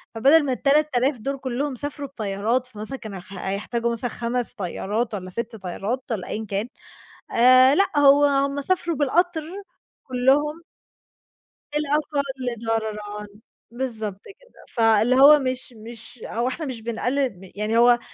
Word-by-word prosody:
فبدل 285 +7 +5
ما 270 - -1
ال3.000 275 -1 +2
دُول 275 +5 -3
كلّهم 265 +2 -3
سافروا 285 +2 -6
بطيارات، 225 +1 -2
فمثلًا 225 +3 -7
كانوا 210 -6 -8
خ 185 - -14
هيحتاجوا 205 +5 -2
مثلًا 235 +1 -3
5 240 +1 -3
طيارات 210 +3 -3
والّا 185 -2 -5
6 230 +4 -5
طيارات 210 +6 -4
والّا 205 -5 -3
أيًا 220 +1 -4
كان 205 +3 -2 0.6
آآ 255 +3 +6
لأ، 315 -5 +2
هو 285 0 +6
هُم 280 0 +1
سافروا 340 +1 0
بالقطر 320 +4 +1 0.6
كلّهم. 280 +6 +1 1.1
الأقل 295 -1 0 0.4
ضررًا، 210 -2 -3 0.4
بالضبط 220 -5 -4
كده. - - -17
فاللي 225 +1 +3
هو 285 +3 +8
مش 255 -2 -4
مش 230 +2 -12
هو 235 +2 -1
إحنا 305 +5 -3
مش 250 -5 -6
بنقلّل 245 +4 -1
م 190 -1 -13
يعني 215 +2 -1
هو 240 0 +6
245 Hz, 140 wpm, -23 LUFS, 220-280 Hz, 1.1 s, هو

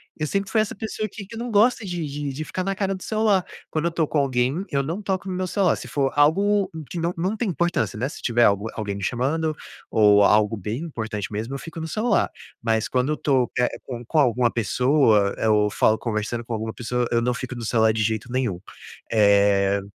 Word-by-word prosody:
Eu 155 - -2
sempre 195 +4 -2
foi 220 - +3
essa 215 - -3
pessoa 215 +1 -4
que 200 +1 -9
que 230 - -11
não 235 +2 -4
gosta 225 +2 +3
de 175 -4 -3
de 145 -1 -4
de 145 +4 -5
ficar 185 - -3
na 195 +1 -2
cara 195 0 -1
do 190 - -7
celular. 215 -3 +1 0.3
Quando 155 +1 -1
eu 170 - +1
tô 165 -2 0
com 150 - 0
alguém, 135 +4 0
eu 140 -1 0
não 165 +9 -4
toco 195 -1 -2
no 190 - -3
meu 185 0 -2
celular, 190 0 +2
se - - -8
for 135 -2 0
algo 195 +7 +3 0.2
que 175 - -5
não 170 +1 0
não 185 +6 -1
tem 220 -1 -2
importância, 170 - -1
né, 125 +5 -1
se 150 - -9
tiver 120 0 +2
algu 100 +1 +3
alguém 105 -2 -3
me 100 - -7
chamando 150 - 0 0.3
ou 105 -1 +5
algo 105 +2 +4
bem 110 - -4
importante 110 - -5
mesmo, 115 +6 -3
eu - - -3
fico 165 +3 -8
no 160 - -4
celular, 215 +8 +1 0.3
mas 110 -2 0
quando 130 +3 0
eu - - -4
tô, 130 -4 +1
eh, 125 - +3 0.2
com 120 -2 -7
com 155 +7 +1
alguma 125 -3 +3
pessoa, 115 -3 +3
eu 105 -1 +3
falo 110 +1 +3
conversando 115 +1 -3
com 115 - -5
alguma 110 0 -3
pessoa, 125 0 -1
eu 120 - +3
não 125 +1 0
fico 130 +1 -6
no 120 -1 -6
celular 110 -1 +3
de 110 0 0
jeito 110 +3 -2
nenhum, 120 -9 -1 0.5
eh, 100 -2 +4
130 Hz, 230 wpm, -23 LUFS, 110-175 Hz, 0.5 s, ou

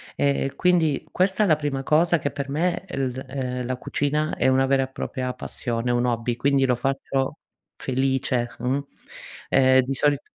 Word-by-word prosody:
E, 140 -1 0
quindi 165 -5 +2
questa 190 +3 +2
è - - +3
la 155 - +5
prima 145 -3 -2
cosa 165 +3 +3
che, 145 - -1
per 140 -1 -5
me, 175 +5 -1
el 135 -7 -2 0.2
uhm, 125 -2 -3
la 130 0 -2
cucina 150 +3 -1
è - - +1
una 130 0 +4
vera 135 -1 +3
e 130 - -7
propria 130 -1 -4
passione, 120 -1 -3
è - - +2
un 120 +1 +1
hobby, 120 0 -1
quindi 140 +1 +2
lo 125 - +2
faccio, 135 +2 -2 0.4
felice, 130 -2 0
mh. 130 +3 0 0.7
Ehm, 130 0 +5
di 135 +2 -3
solit 145 +1 +2
135 Hz, 180 wpm, -24 LUFS, 130-145 Hz, 0.7 s, la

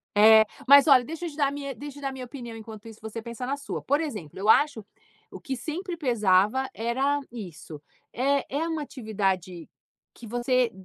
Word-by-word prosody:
É, 220 +1 +8 0.2
mas 280 +1 +8
olha 260 -3 +7
deixa 325 +3 -6
eu - - -3
te 295 - -13
dar 285 -2 +3
a - - -2
minha 280 -1 -5
deixa 290 +1 -9
eu - - -13
dar 275 - -2
a - - -6
minha 260 -1 -7
opinião 240 -3 -8
enquanto 220 -1 -10
isso 225 -1 -12
você 220 +1 -6
pensa 235 +2 -6
na 275 +3 -2
sua. 280 - -5
Por 285 +3 +1
exemplo 210 - -6
eu 210 +2 -1
acho 285 -5 +4 0.4
o - - -10
que 265 - -4
sempre 340 +5 -5
pesava 225 - +2
era 265 +6 0
isso, 170 -9 -9 0.3
é 275 +2 +1
é 320 +3 0
uma 320 -2 -2
atividade 195 - -3 0.5
que 240 - -12
você 245 +1 +1
250 Hz, 205 wpm, -26 LUFS, 220-280 Hz, 0.5 s, É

